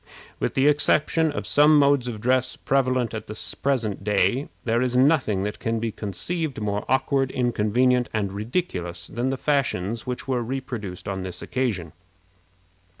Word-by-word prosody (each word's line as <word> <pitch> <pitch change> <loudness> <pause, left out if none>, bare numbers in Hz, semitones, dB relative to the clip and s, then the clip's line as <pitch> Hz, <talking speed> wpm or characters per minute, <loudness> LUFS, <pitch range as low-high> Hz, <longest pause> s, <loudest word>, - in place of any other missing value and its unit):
With - - -2
the 135 - +3
exception 150 +2 +3
of 145 - -4
some 150 +1 +5
modes 140 -3 +4
of 115 -3 -4
dress 130 +2 +1
prevalent 130 -3 0
at 110 0 -5
the 105 +1 -4 0.2
present 115 -8 0
day, 105 +6 +1
there 115 0 +1
is 125 -1 +1
nothing 125 -8 +3
that 105 +1 -4
can 115 0 -1
be 115 0 -2
conceived 130 - -3
more 105 -1 -2
awkward, 135 0 +2
inconvenient, 125 +1 +1
and 100 -3 -1
ridiculous 95 - -3
than 120 +7 -2
the 135 - -1
fashions 120 -7 -1
which 125 +1 -4
were 130 -2 0
reproduced 120 -7 -5
on 95 -1 -3
this 90 -1 -6
occasion. 105 - -2
120 Hz, 155 wpm, -24 LUFS, 105-135 Hz, 0.2 s, some